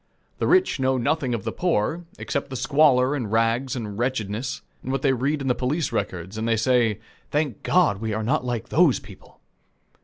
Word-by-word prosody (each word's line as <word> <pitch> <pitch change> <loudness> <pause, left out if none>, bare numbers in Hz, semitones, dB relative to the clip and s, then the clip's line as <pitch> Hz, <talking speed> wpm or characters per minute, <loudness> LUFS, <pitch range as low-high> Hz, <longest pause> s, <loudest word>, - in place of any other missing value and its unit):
The - - 0
rich 370 - +3
know 130 0 +2
nothing 130 0 0
of 110 - -5
the - - -2
poor, 170 0 0
except 140 0 -3
the 130 - -6
squalor 135 -1 +3
and 120 -8 -3
rags 115 +4 +1
and 105 -4 -5
wretchedness, 120 -1 -2 0.2
and 130 - -4
what 135 -1 -2
they 135 -2 +4
read 140 +4 -1
in - - -3
the 125 - +3
police 135 +5 -1
records, 95 -2 -3
and 110 - -2
they 115 -1 +2
say, 115 -2 +2 0.3
"Thank 145 -6 -1
God, 160 - +2
we 110 -1 -2
are 110 +1 -2
not 130 +5 +1
like 120 -1 -3
those 155 -4 +4
people!" 100 -1 -16
125 Hz, 195 wpm, -24 LUFS, 110-140 Hz, 0.3 s, they